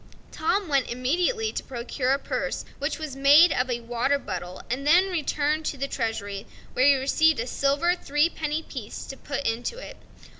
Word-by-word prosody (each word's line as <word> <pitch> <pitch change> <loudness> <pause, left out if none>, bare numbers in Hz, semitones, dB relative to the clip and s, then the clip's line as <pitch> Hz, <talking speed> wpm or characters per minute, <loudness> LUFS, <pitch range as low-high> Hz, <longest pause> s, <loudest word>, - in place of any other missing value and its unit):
Tom 385 +5 0
went 275 -4 +1
immediately 355 - 0
to - - -3
procure 250 +1 -3
a 270 - +4
purse - - -3
which 285 +3 -2
was 310 -4 -6
made 290 +5 +7
of 250 -1 0
a 240 -1 -2
water 240 +4 0
bubble, 185 -7 -6
and 270 +4 -3
then 365 +5 +5
returned 305 -2 0
to 285 - -3
the 275 +1 -2
treasury, 220 -5 -3 0.3
where 255 - +3
he 285 - +7
received 280 +2 +3
a 230 - -1
silver 280 +7 +1
three 295 -3 +1
penny 315 -1 -3
piece 235 -9 -7
to 270 - -8
put 280 +1 -5
into 240 - -2
it. - - -9
280 Hz, 185 wpm, -26 LUFS, 250-315 Hz, 0.3 s, made